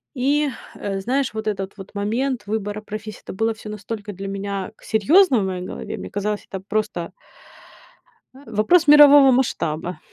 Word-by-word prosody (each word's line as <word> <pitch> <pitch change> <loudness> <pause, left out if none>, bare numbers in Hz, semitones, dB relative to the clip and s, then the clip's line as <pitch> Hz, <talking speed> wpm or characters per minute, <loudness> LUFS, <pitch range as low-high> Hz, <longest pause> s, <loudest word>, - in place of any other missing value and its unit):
и, 285 +4 +1 0.3
э, 195 -1 -4
знаешь, 265 +5 -1
вот 220 0 -5
этот 195 -1 -3
вот 195 +1 -11
момент 235 +5 -2
выбора 210 0 -3
профессии- 215 0 -7
это - - -8
было 225 +3 0
всё 220 -1 -12
настолько 210 +1 -6
для 195 +1 -7
меня 195 0 -4
к - - -23
серьёзно 260 - +4
в - - -1
моей 185 -1 -3
голове. 185 - -6
Мне - - -7
казалось, 205 +1 -3
это 190 -1 -6
просто 210 -5 -2 1.4
вопрос 305 - +3
мирового 290 -2 +8
масштаба. 180 -9 -1
215 Hz, 160 wpm, -22 LUFS, 195-255 Hz, 1.4 s, мирового